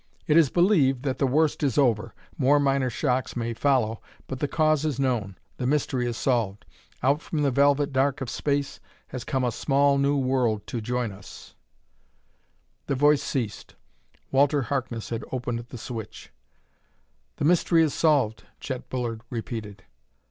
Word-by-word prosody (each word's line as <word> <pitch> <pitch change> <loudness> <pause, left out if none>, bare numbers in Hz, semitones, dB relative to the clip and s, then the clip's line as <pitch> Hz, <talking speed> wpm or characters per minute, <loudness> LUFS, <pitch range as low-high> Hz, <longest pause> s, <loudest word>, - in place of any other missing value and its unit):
"It 150 - +2
is 160 -5 +6
believed 150 -8 +3
that 135 -2 -2
the 135 - +2
worst 155 +4 +1
is 135 -6 0
over. 115 -8 +2 0.2
More 140 +3 +3
minor 135 -2 +1
shocks 130 +1 -1
may 115 -1 -2
follow, 115 -4 +1 0.2
but 130 - -6
the 145 - 0
cause 155 -1 +2
is 150 -4 -1
known; 120 -8 -1 0.2
the 125 - -2
mystery 130 -3 0
is 120 -1 -3
solved. 115 -6 -1 0.4
Out 140 +4 +2
from 155 -3 -2
the 140 - +2
velvet 140 +1 +3
dark 135 +1 +1
of 135 - -4
space 140 +3 -2 0.3
has 125 - -6
come 130 -3 -1
a 125 - +1
small, 140 +3 +2
new 140 +1 +2
world 130 -6 0
to 120 - -4
join 120 0 -2
us 95 - -12 0.7
" - - -43
The 140 - 0
voice 145 +2 +4
ceased. 115 -6 -4 0.6
Walter 140 +1 +3
Harkness 120 -4 -3
had 115 -1 -3
opened 120 -2 -2
the 125 - -8
switch. 115 -1 -8 1.0
"The - - -2
mystery 170 0 +4
is 155 - 0
solved," 140 -9 +2 0.2
Chet 130 -2 -6
Bullard 120 -3 -3
repeated. 110 -3 -6
130 Hz, 165 wpm, -26 LUFS, 120-145 Hz, 1.0 s, is